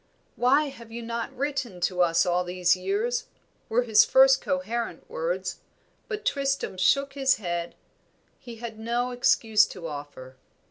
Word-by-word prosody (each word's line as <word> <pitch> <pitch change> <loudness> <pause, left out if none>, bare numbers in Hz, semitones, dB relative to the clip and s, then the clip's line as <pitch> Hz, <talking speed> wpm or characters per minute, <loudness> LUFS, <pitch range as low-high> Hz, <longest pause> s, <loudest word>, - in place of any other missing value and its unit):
"Why 280 +4 +3
have 235 -4 -13
you 235 +1 -6
not 235 +2 -4
written 270 -8 -3
to 180 0 0
us 170 0 +3
all 180 0 +1
these 180 0 +2
years?" 450 - -2 0.4
were 245 +2 +2
his 220 -3 +6
first 265 0 +5
coherent 240 - -3
words; - - -3 0.5
but 425 -2 -5
Tristram 275 -7 -1
shook 275 +9 +2
his 270 -1 +2
head 175 -4 -4 0.6
he 240 -2 -10
had 225 -1 -8
no 240 +2 -1
excuse 220 -3 +3
to 180 -3 -9
offer. 145 -4 -8
235 Hz, 145 wpm, -26 LUFS, 185-275 Hz, 0.6 s, his